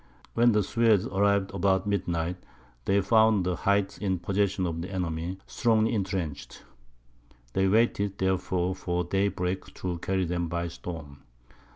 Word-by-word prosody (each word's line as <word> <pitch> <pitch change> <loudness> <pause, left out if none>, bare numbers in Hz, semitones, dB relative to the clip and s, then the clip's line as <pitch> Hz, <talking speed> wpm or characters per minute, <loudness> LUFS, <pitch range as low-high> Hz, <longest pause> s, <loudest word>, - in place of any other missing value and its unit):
When 120 +1 +4
the 105 -1 +3
Swedes 115 -2 +3
arrived 100 0 +1
about 95 0 +1
midnight, 90 -3 -1 0.5
they 100 +1 +3
found 110 -1 +4
the 90 -1 0
heights 100 +1 0
in 95 -3 0
possession 95 +1 0
of 85 -1 -3
the 90 - -5
enemy, 90 -1 -3
strongly 110 -2 +2
entrenched. 95 -7 -3 0.9
They 95 0 +2
waited, 100 -1 +2
therefore, 95 -1 0
for 90 -1 -2
daybreak, 95 0 -1
to 90 -2 -4
carry 95 +1 0
them 85 0 -1
by 85 +1 -2
storm. 80 -5 -8
95 Hz, 140 wpm, -28 LUFS, 90-100 Hz, 0.9 s, When